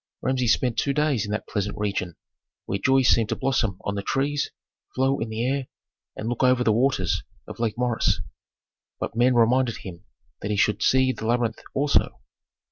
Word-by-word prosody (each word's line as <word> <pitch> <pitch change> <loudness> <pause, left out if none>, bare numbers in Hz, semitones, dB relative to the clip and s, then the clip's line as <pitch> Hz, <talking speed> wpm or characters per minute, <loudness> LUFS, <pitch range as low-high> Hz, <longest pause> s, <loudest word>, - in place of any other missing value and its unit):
Rameses 130 -3 +2
spent 125 -2 -1
two 140 - +1
days 145 -7 +1
in 105 - -5
that 105 - -3
pleasant 105 0 -3
region 100 -5 -2 0.5
where 100 - -2
joy 135 +3 +3
seemed 115 -3 +3
to - - 0
blossom 120 -8 0
on 100 - -3
the 100 - -3
trees, 140 +7 -1 0.5
flow 135 +1 +1
in 115 - -3
the 110 +2 -2
air, 135 0 -1 0.5
and 110 - -5
look 120 0 -2
over 125 -1 +4
the 110 - +3
waters 120 -6 +1 0.3
of - - -9
Lake 115 -2 -1
Moeris. 120 -4 +1 0.8
But - - -4
men 125 +2 +3
reminded 120 +1 +3
him 85 -3 -10 0.4
that 100 - -4
he 105 - 0
should 105 +1 +2
see 130 0 +4
the 110 -3 -5
labyrinth 120 -1 0
also. 145 +1 +1
120 Hz, 185 wpm, -25 LUFS, 105-130 Hz, 0.8 s, over